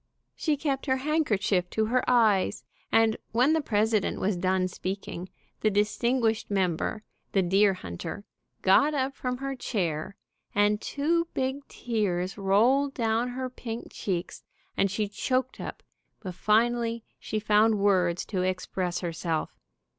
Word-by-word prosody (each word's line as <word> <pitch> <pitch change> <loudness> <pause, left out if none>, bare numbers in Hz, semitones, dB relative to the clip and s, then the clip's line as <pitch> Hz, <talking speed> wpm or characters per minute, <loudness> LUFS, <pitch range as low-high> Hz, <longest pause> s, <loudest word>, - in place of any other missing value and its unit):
She 305 -3 0
kept 275 -1 -2
her 260 0 +2
handkerchief 215 - +1
to 220 +3 0
her 250 +3 +1
eyes, 220 -6 +3 0.3
and 225 -1 +4 0.2
when 250 +7 +4
the 320 - +2
president 215 -4 +1
was 195 +1 +1
done 185 +1 +1
speaking, 185 -1 -5 0.3
the 215 - +2
distinguished 220 +3 +1
member, 190 +1 0 0.3
the 195 - +3
deer 195 +2 +4
hunter, 95 - -7 0.4
got 285 +11 +5
up 270 0 0
from 250 -2 -3
her 275 +1 -3
chair, 180 -8 -2 0.4
and 205 +1 +3
two 335 +4 0
big 265 +2 -2
tears 195 -6 -2
rolled 240 +8 +3
down 230 0 +1
her 255 +1 -3
pink 235 -2 -7
cheeks, 180 -3 -3 0.3
and 195 - +2
she 205 +2 -1
choked 255 +5 -1
up, - - -7 0.4
but 185 -4 -6
finally 230 +3 +1 0.2
she 215 - -3
found 215 +1 +4
words 185 -4 +2
to 190 -4 -2
express 185 -1 -2
herself. 165 -2 -2
215 Hz, 140 wpm, -27 LUFS, 190-250 Hz, 0.4 s, got